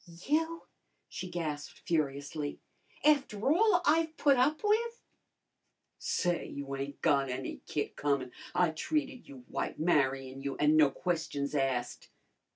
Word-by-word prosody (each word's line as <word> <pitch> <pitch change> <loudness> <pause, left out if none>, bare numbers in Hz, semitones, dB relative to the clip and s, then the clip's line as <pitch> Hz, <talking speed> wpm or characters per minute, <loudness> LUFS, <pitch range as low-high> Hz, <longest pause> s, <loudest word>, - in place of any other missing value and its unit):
"You?" 325 +3 0 0.5
she 185 - -6
gasped 155 -4 -4
furiously. 145 -1 -1 0.5
"After 280 -4 +3
all 370 0 +4
I've 320 +1 +2
put 285 -2 +5
up 285 +7 +2
with!" 460 +3 +1 1.0
"Say, 175 -1 0
you 140 -1 -5
ain't 140 +1 -6
got 140 -3 +3
any 130 +1 -4
kick 145 - -2
comin'! 140 -3 0 0.2
I 175 -2 +3
treated 275 - -2
you 130 -3 -12
white, - - -3
marryin' 135 -4 +1
you, 140 0 -3
an' 150 +1 +4
no 155 -2 +6
questions 150 -3 -2
asked." 135 -4 -1
155 Hz, 130 wpm, -31 LUFS, -, 1.0 s, no